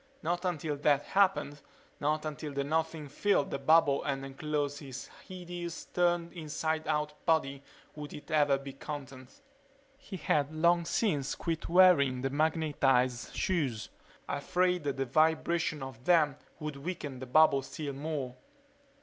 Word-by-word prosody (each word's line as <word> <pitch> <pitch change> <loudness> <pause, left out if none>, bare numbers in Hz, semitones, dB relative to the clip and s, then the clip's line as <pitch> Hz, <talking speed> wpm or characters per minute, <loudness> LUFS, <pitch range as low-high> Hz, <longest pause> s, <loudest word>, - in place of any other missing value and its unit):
Not 175 +3 -1
until 155 -4 -2
that 145 0 +2
happened, 150 -7 +1 0.4
not 155 +1 0
until 150 -1 -5
the 140 0 -1
Nothing 160 +1 -1
filled 145 +3 +1
the 140 - -2
bubble 145 -1 +4
and 135 -1 -2
enclosed 145 +1 -2
his 135 -3 -8 0.2
hideous, 175 -2 -6
turned 175 -1 0
inside 160 -1 -3
out 150 -1 -2
body 140 -4 +1 0.3
would 150 -1 -8
it 150 - -10
ever 145 -3 +4
be 135 0 -8
content... 135 - -9 0.6
He 220 -9 -8
had 145 -3 +1
long 170 +2 +3
since 150 - 0
quit 165 -1 -3
wearing 165 -8 +5
the 135 - 0
magnetized 140 -5 +1
shoes, 140 - -1 0.4
afraid 180 -3 0
the 135 -1 -1
vibration 155 +2 +1
of 130 -2 -9
them 155 -6 +4 0.2
would 150 -2 -5
weaken 145 -4 -5
the 130 - -7
bubble 140 0 +5
still 140 +1 -6
more. 140 -3 -4
150 Hz, 140 wpm, -31 LUFS, 140-165 Hz, 0.6 s, wearing